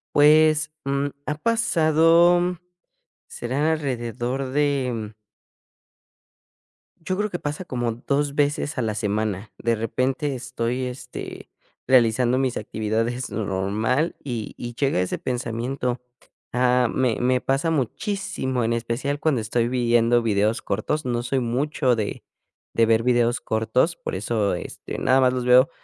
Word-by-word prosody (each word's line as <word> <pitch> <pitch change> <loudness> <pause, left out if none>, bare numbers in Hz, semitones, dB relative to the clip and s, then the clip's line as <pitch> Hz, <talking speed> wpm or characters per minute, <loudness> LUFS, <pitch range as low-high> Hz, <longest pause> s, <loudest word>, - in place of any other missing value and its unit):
Pues, 155 +1 +5
mm, 140 +1 0 0.2
ha 150 - -1
pasado 175 -3 +3 0.7
será 140 +6 -1
alrededor 130 -2 -2
de 130 -6 -1 1.8
Yo 185 +3 -3
creo 210 0 0
que 175 - -4
pasa 150 +5 -4
como 120 -4 -2
2 140 +4 -1
veces 145 +1 0
a 130 - +1
la 110 -2 -1
semana. 105 -1 -2
De 115 0 0
repente, 130 +5 -1
estoy, 125 0 -3
este, 125 +1 -7 0.4
realizando 125 0 +4
mis 130 -2 0
actividades 110 +4 -2
normal 110 - -1
y 120 -6 -4
y 120 -1 -6
llega 135 -9 +1
ese 90 - -2
pensamiento, 125 +1 -3 0.5
ah, 125 -1 +3
me 125 -4 +1
me 125 +1 +2
pasa 135 +5 0
muchísimo, 135 - -2
en 115 +1 +1
especial, 120 +5 -2
cuando 145 -8 +1
estoy 115 +2 0
viendo 120 -1 +3
videos 110 0 +1
cortos. 145 +10 -2
No 120 -1 -1
soy 135 +2 0
mucho 130 +1 0
de 105 -2 -4 0.5
de 115 - +4
ver 115 0 +3
videos 120 -1 +2
cortos, 110 +9 +1
por - - -6
eso, 105 0 0
este, 90 - -7
nada 130 +1 +3
más 130 -1 +4
los 125 -1 -2
veo 125 +2 +6
125 Hz, 130 wpm, -23 LUFS, 115-145 Hz, 1.8 s, veo